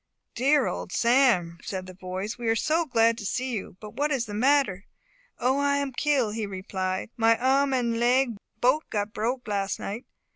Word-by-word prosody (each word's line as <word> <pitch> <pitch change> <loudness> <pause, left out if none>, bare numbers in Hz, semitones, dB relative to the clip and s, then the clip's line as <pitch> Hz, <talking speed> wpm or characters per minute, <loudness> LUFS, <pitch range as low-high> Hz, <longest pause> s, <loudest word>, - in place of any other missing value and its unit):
"Dear 275 +3 +3
old - - -4
Sam!" 235 -10 +3
said 190 -2 -5
the 185 - -10
boys, 185 +3 -5
"we 240 -1 -5
are 225 - +3
so 320 +7 +1
glad 230 -2 +3
to - - -7
see 255 +4 -2
you. 200 -5 -5
But 210 -1 -10
what 290 +5 0
is 265 -5 0
the 210 - -8
matter?" 235 -4 +2 0.5
"O, 260 +3 +1
I 285 0 +2
am 280 -1 -2
kill!" 265 -5 +1
he 215 -1 -3
replied; 185 +1 -4
"my 225 0 +4
arm 270 +2 +2
and 235 -3 0
leg 245 0 +2 0.2
bote 255 +6 +2
got 210 0 -2
broke 240 +3 -2
las' 200 -1 -1
night. 215 +5 -6
235 Hz, 190 wpm, -26 LUFS, 205-265 Hz, 0.5 s, my